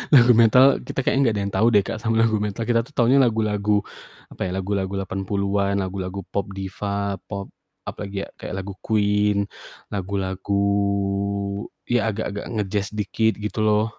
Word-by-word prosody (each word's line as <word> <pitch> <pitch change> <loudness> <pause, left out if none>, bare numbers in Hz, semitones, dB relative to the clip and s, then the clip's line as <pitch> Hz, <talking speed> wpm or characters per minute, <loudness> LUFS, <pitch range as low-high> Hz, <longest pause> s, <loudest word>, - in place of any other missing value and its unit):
Lagu 125 -1 +8
metal 125 +4 +6
kita - - -4
kayaknya 135 - +2
enggak 115 -5 +2
ada - - 0
yang 100 - -4
tau 115 - +3
deh, 100 -2 +5
Kak, - - -3
sama 115 -1 0
lagu 110 -2 +2
metal, 105 +2 -2
kita 120 -1 +3
tuh 150 - -21
taunya 125 +2 +4
lagu-lagu 105 -3 +1 0.5
apa - - -13
ya, - - -4
lagu-lagu 95 0 -2
80-an, 100 +1 -1
lagu-lagu 95 0 -4
pop 100 -2 -1
diva, 100 0 -3
pop, 100 -1 -5 0.3
apalagi 100 -1 -5
ya, - - -14
kayak - - -6
lagu 100 0 -6
Queen, 105 -1 +2 0.5
lagu-lagu 95 0 -2 1.2
ya 115 -2 +1
agak-agak 105 -1 -4
nge-jazz 100 -1 -1
dikit, 110 +2 +1
gitu 105 +1 -4
loh. 105 0 +3
100 Hz, 160 wpm, -23 LUFS, 100-110 Hz, 1.2 s, Lagu